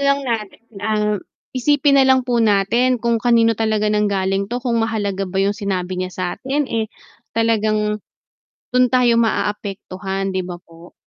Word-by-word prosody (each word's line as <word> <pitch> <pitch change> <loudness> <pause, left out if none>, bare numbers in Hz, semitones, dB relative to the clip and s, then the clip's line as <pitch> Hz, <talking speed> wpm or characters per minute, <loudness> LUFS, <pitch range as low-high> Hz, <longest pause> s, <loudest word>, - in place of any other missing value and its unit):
lang 280 0 +2
natin 225 -5 -3 0.2
ah, 210 0 0 0.4
isipin 280 +2 +3
nalang 260 -1 +4
po 240 -2 +1
natin 225 +4 +3
kung 235 -1 +1
kanino 230 -1 +4
talaga 215 -1 +1
nang 210 0 +2
galing 195 0 0
to 240 - -2
kung 240 -2 0
mahalaga 205 -3 -1
ba 185 - -6
yung 200 +1 +2
sinabi 185 -3 -3
niya 185 - -2
sa'tin, 260 +12 -2
eh, 220 -1 -1 0.5
talagang 215 -2 +1 0.7
dun 250 0 +5
tayo 245 -2 +4
maaapektuhan, 195 -2 -2
'di 185 - -1
ba, 175 -1 -6
po? 165 +1 -16
215 Hz, 150 wpm, -20 LUFS, 195-240 Hz, 0.7 s, dun